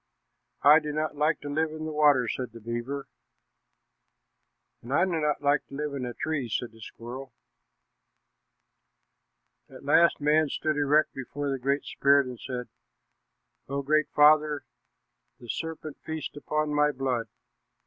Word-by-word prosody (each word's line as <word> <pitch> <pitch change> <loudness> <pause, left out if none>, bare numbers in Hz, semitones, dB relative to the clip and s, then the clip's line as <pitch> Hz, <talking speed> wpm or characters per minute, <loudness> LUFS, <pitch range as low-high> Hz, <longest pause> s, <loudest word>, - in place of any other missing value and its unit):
"I 150 +2 +8
do 150 -1 -5
not 155 0 -2
like 150 +1 +1
to 145 - -7
live 155 +2 0
in 155 0 -6
the 155 - -4
water," 145 -5 +4
said 125 0 -4
the 115 - -10
beaver. 120 +5 -4 1.7
"And 120 - -10
I 150 - +4
do 190 - -3
not 150 -1 0
like 145 0 +2
to 140 - -10
live 150 0 -3
in 130 -3 -3
a 120 - -6
tree," 145 -6 -2
said 120 +2 -2
the 115 0 -18
squirrel. 125 +4 -9 2.4
At - - -13
last 165 +3 +4
man 150 +1 +3
stood 155 +2 -1
erect 150 +1 +2
before 140 +2 -4
the 135 - -2
Great 140 +3 0
Spirit 140 0 +3
and 125 -2 -8
said, 125 -2 -5 1.0
"O 140 0 -2
Great 155 +2 +2
Father, 150 -1 +4 0.7
the 120 - -13
serpent 160 +2 -5
feasts 160 -2 -5
upon 150 +1 -2
my 150 0 +3
blood. 130 -4 -2
145 Hz, 150 wpm, -27 LUFS, 130-155 Hz, 2.4 s, I